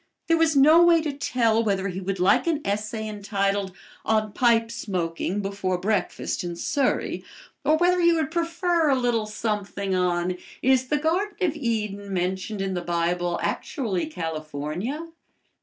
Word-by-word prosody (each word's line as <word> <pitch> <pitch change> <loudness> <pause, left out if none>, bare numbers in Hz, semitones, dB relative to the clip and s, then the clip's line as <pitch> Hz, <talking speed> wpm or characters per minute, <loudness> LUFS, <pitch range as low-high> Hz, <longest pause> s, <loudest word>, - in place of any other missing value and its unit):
There 330 0 +3
was 325 -2 +3
no 305 +5 +7
way 340 -1 +6
to 300 -2 -2
tell 230 -5 +1
whether 200 -2 0
he 185 +1 -5
would 195 0 -3
like 185 - +3
an 315 -3 +1
essay 210 +2 -2
entitled 200 -2 -1 0.3
"On 215 -1 +1
Pipe 230 -1 +3
Smoking 190 -3 -2
Before 195 -2 -1
Breakfast 205 0 -1
in 175 -1 -4
Surrey," 275 - -1 0.4
or 305 +3 +3
whether 355 +1 +3
he 340 0 +5
would 320 -1 0
prefer 335 -1 +1
a 275 - +4
little 240 -4 0
something 205 -2 -3
on 180 0 0 0.3
"Is 260 0 +3
the 295 - +1
Garden 345 +7 0
of 335 -5 +1
Eden 210 -7 -2
Mentioned 190 +3 -2
in 195 -1 -1
the 180 - -2
Bible 175 0 0
Actually 220 - -2
California?" 160 - -4
215 Hz, 155 wpm, -25 LUFS, 190-290 Hz, 0.4 s, no